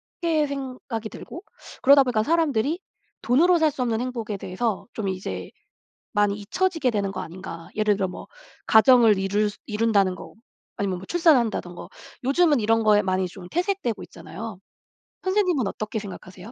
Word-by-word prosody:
쉽게 320 -4 -1
생각이 255 -5 -5
들고 340 - -10 0.4
그러다 275 +1 +7
보니까 235 -4 0
사람들이 315 -1 +1 0.4
돈으로 335 +8 +4
살 310 -2 +3
수 275 - -6
없는 230 -1 -1
행복에 230 -5 -4
대해서 195 +4 -3
좀 210 -3 -3
이제 185 0 -5 0.6
많이 205 -1 +2
잊혀지게 325 - 0
되는 200 -3 -1
거 185 - -5
아닌가. 170 -1 -9
예를 210 -1 +2
들어 190 -1 -1
뭐 180 - -9 0.4
가정을 220 -2 +6
이룰 205 +2 +1
수 - - -17
이룬다는 210 -4 +2
거 - - -11 0.4
아니면 190 -3 -1
뭐 185 - -9
출산한다는 245 - +2
거. - - -9 0.4
요즘은 290 0 +3
이런 225 +1 +2
거에 210 -1 +5
많이 185 -1 0
좀 180 0 -11
퇴색되고 355 - -1
있잖아요. 205 +2 -9 0.7
선생님은 370 - +1
어떻게 215 +2 -4
생각하세요? 190 0 -10
220 Hz, 365 characters per minute, -24 LUFS, 200-280 Hz, 0.7 s, 그러다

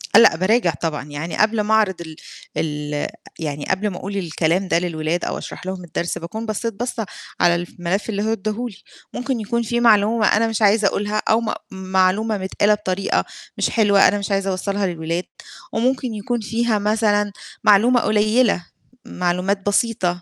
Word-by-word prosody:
آه، - - +11
لأ 230 - +7
باراجع 185 +2 +2
طبعًا. 160 -3 -2
يعني 150 +3 -5
قبل 215 0 +3
ما 210 +1 0
أعرض 205 -5 +2
ال 160 -2 -8 0.4
ال 150 -1 -2 0.3
يعني 150 -2 -4
قبل 190 +2 0
ما 180 - -6
أقول 200 +2 -5
الكلام 170 +1 0
ده 170 - +2
للولاد 170 -1 -2
أو - - -2
أشرح - - -8
لهم 185 -1 -4
الدرس، 170 0 -3
باكون 215 +7 -6
بصّيت 225 +1 -2
بَصّة 230 +1 -3 0.3
على 175 0 +4
الف 175 0 -5
ملف 185 +5 -1
اللي 205 -1 -1
هو 220 - 0
إدّاه 215 +3 -3
لي، 200 - -14 0.4
ممكن 255 -1 -2
يكون 235 +2 -1
في 235 +2 -1
معلومة 220 -1 +4
أنا 225 +2 +3
مش 225 -1 -2
عايزة 210 0 +4
أقولها 210 +2 -1
أو 225 +1 +4
م 220 -2 -1 0.2
معلومة 190 +3 +1
متقالة 200 +2 +1
بطريقة 195 -2 -1 0.3
مش - - +1
حلوة 205 -3 +5
أنا 205 - +1
مش 200 - -4
عايزة 195 0 +1
أوصّلها 195 +1 -1
للولاد 170 0 -2 0.5
وممكن 250 0 0
يكون 235 +3 -2
فيها 225 0 0
مثلًا 210 -1 +1 0.3
معلومة 230 +5 +5
قليّلة، 215 -2 +2 0.4
معلومات 180 +2 -1
بسيطة. 200 -4 +1
200 Hz, 175 wpm, -21 LUFS, 180-220 Hz, 0.5 s, آه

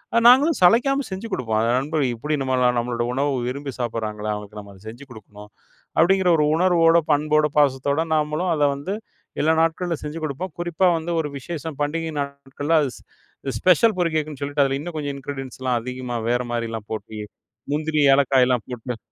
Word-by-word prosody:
அ - - +5
நாங்களும் 285 +6 +6
சளைக்காம 270 +8 +4
செஞ்சு 195 +5 -5
குடுப்போம். 110 -3 -1
"அந்த 115 +1 +1
நண்பர்களுக்கு 140 -4 -1
இப்டி 150 +5 -2
நம்பலான 125 -1 +2
நம்மளோட 120 0 -2
உணவு 140 +2 0 0.2
விரும்பி 140 +1 -4
சாப்பிடுறாங்களே! 110 -3 -3
அவங்களுக்கு 105 0 -7
நம்ம 100 -1 -11
அத 95 - -18
செஞ்சு 125 +5 -11
குடுக்கணும்." 105 -1 -13 0.5
அப்படீங்கிற 185 +2 +4
ஒரு 150 - +3
உணர்வோட, 170 -2 +4
பண்போட, 150 +1 +3
பாசத்தோட 140 +2 +2
நாமளும் 155 +4 0
அத 150 - +1
வந்து 180 +9 -4 0.5
எல்லா 160 +2 +3
நாட்கள்ல 165 +1 0
செஞ்சு 150 +2 -5
குடுப்போம். 155 +4 -4
குறிப்பா 175 +2 +1
வந்து 165 +2 -4
ஒரு 150 - -4
விசேஷம் 160 -1 -6
பண்டிகை 160 +2 -2
நாட்கள்ல, 140 +2 -3
அது 140 - 0
ஸ் - - -17 0.6
ஸ்பெஷல் 185 +4 +4
பொரி 170 -1 +2
கேக்குன்னு 150 -2 -2
சொல்லிட்டு 145 0 +1
அதில 135 0 0
இன்னும் 170 +2 -7
கொஞ்சம் 145 -2 -3
இன்கிரீடியன்ட்ஸ்லாம் 130 -2 -3
அதிகமா 125 -1 -5
வேற 120 +1 +1
மாரிலாம் 115 -2 -4
போட்டு 110 0 -6 0.5
முந்திரி, 155 0 0
ஏலக்காய்லாம் 130 -3 +3
போட்டு. 125 -1 -5
145 Hz, 165 wpm, -22 LUFS, 125-165 Hz, 0.6 s, நாங்களும்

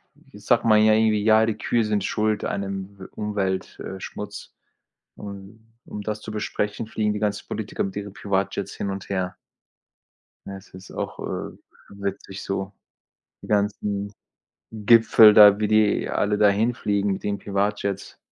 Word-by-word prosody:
w - - -17
sagt - - +1
man 110 -1 +5
ja 110 0 +5
irgendwie: 110 -1 +2
„Ja, 110 0 +5
die 110 -1 -2
Kühe 115 -2 0
sind 105 -2 0
Schuld 110 0 0
an 100 - -2
'nem 100 0 -6
w 95 - -9
Umwelt 100 -3 -3
äh, 95 - -7
Schmutz“. - - -8 0.6
Und 100 +2 -10 0.2
um 105 - -7
das 105 0 -4
zu 110 - -7
besprechen, 105 +1 -3
fliegen 105 -1 -1
die 105 - -4
ganzen 105 -1 -2
Politiker 105 -1 -3
mit 95 0 -5
ihren 100 -1 -6
Privatjets 100 0 -2
hin 100 - -3
und 95 0 -7
her. 95 -1 -2 1.1
Ja, 100 0 -6
es 95 - -16
ist 95 +1 -12
auch, - - -5
äh, - - -5 0.3
witzig 100 -1 -6
so. 95 0 -3 0.7
Die - - -11
ganzen 100 -1 -1 0.6
Gipfel 110 0 +6
da, 105 -1 +8
wie 105 - +1
die 110 -1 +2
alle 105 0 0
da 105 -1 +5
hinfliegen, 105 -2 0
mit 95 - -7
den 100 -1 -2
Privatjets. 100 0 -2
105 Hz, 165 wpm, -24 LUFS, 100-105 Hz, 1.1 s, da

